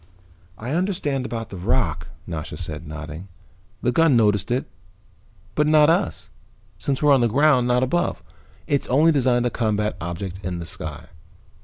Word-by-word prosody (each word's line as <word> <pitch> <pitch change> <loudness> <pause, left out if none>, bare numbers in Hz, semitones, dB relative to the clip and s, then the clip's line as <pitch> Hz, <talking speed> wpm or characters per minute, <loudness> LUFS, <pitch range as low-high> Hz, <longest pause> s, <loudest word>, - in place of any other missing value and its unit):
"I 120 +4 -5
understand 150 -7 -1
about 115 0 -5
the 95 - -6
rock," 85 - 0 0.2
Nasha 75 -2 -5
said, 80 +1 -6
nodding. 80 +3 -7 0.6
"The 125 - +2
gun 155 -1 +4
noticed 105 -3 +2
it, 125 +2 0 0.9
but 150 0 +2
not 155 0 +6
us, 180 +4 -1 0.5
since 140 0 -1
we're 145 -1 +6
on 135 - +4
the 120 - +4
ground, 130 +1 +3
not 125 +1 +3
above. 130 - -1 0.4
It's 140 -1 0
only 150 +6 +4
designed 125 -4 +2
to 120 - +1
combat 105 -2 -1
objects 90 +2 -5
in 90 -1 -4
the 85 - -6
sky. - - -7
120 Hz, 160 wpm, -23 LUFS, 90-140 Hz, 0.9 s, not